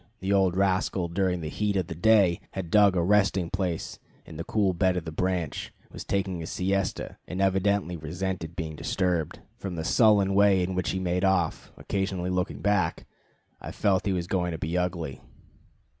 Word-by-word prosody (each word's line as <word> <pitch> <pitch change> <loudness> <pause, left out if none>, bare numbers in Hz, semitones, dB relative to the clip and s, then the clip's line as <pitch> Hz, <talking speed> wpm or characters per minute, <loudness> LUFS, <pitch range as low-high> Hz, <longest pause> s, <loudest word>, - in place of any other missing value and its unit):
The 95 +1 -1
old 95 -2 +3
rascal 95 -2 +1
during 90 0 0
the 80 - -4
heat 105 +4 -1
of 95 -2 +1
the 85 - -6
day 100 0 +4
had 90 -4 -5
dug 100 -3 +5
a 85 - +2
resting 95 -2 +2
place 90 -4 -3 0.3
in 80 - -11
the 85 - -4
cool 100 0 +1
bed 90 +1 +1
of 85 - -3
the 80 - -5
branch, 90 -2 -2 0.2
was - - -7
taking 95 -2 -1
his 80 - -6
siesta, 95 +1 -2
and 90 - -5
evidently 95 -1 +1
resented 85 +1 -4
being 80 -3 -4
disturbed. 85 -1 -1 0.2
From 95 -3 -5
the 80 - -3
sullen 100 -2 +4
way 100 -2 +4
in 95 +1 -2
which 90 -2 -1
he 95 - -1
made 90 0 -1
off, 95 -4 +1
occasionally 95 -2 -2
looking 90 -6 -2
back, 100 -6 +1 0.6
I - - -7
felt 95 -1 +1
he - - +2
was 90 -2 -2
going 90 -1 -1
to - - -4
be 80 +2 -3
ugly. 85 -7 -2
90 Hz, 190 wpm, -27 LUFS, 85-95 Hz, 0.6 s, dug